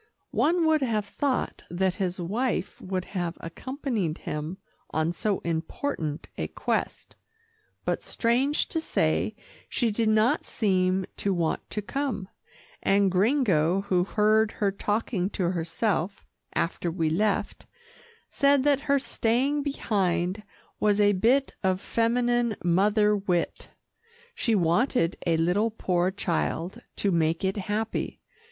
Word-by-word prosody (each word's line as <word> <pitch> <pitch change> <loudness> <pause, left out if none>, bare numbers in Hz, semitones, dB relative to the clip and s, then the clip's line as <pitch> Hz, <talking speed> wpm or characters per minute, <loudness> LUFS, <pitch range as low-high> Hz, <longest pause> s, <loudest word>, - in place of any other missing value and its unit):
One 340 +1 +2
would 315 -1 +3
have 220 -5 0
thought 265 +5 -1
that 185 +1 +1
his 185 0 -1
wife 210 +4 -2
would 185 -1 -3
have 175 -3 -2
accompanied 220 - -3
him 155 +5 -5 0.3
on 160 +2 0
so 205 +2 -1
important 160 - -3
a - - -1
quest, - - -3 0.7
but - - 0
strange 255 +5 +1
to 325 - -1
say - - 0 0.3
she 235 -3 +1
did 220 +1 +1
not 220 +2 +3
seem 185 -3 +1
to 195 -2 0
want 165 -2 -1
to 210 - -3
come, 255 -6 -3 0.5
and 195 -1 +3
Gringo, 190 - +3
who 185 -3 +1
heard 215 +2 +2
her 205 -3 0
talking 205 -1 -1
to 180 -3 +1
herself 180 +2 -1 0.3
after 170 +1 -1
we 165 -1 0
left, 200 +6 0 0.6
said 280 -2 +4
that 285 -1 +3
her 280 - +5
staying 270 +2 +1
behind 195 - 0 0.4
was 210 -1 +3
a 205 0 +5
bit 245 +8 +2
of 185 -1 +1
feminine 240 +1 +1
mother 210 +4 +3
wit. 185 -4 -1 0.6
She 235 - +1
wanted 175 +2 +2
a 165 -1 +3
little 180 +7 +2
poor 180 -4 0
child 185 +2 -2
to 200 - 0
make 165 +1 +1
it 190 +2 0
happy. 210 +3 -2
205 Hz, 130 wpm, -27 LUFS, 175-235 Hz, 0.7 s, her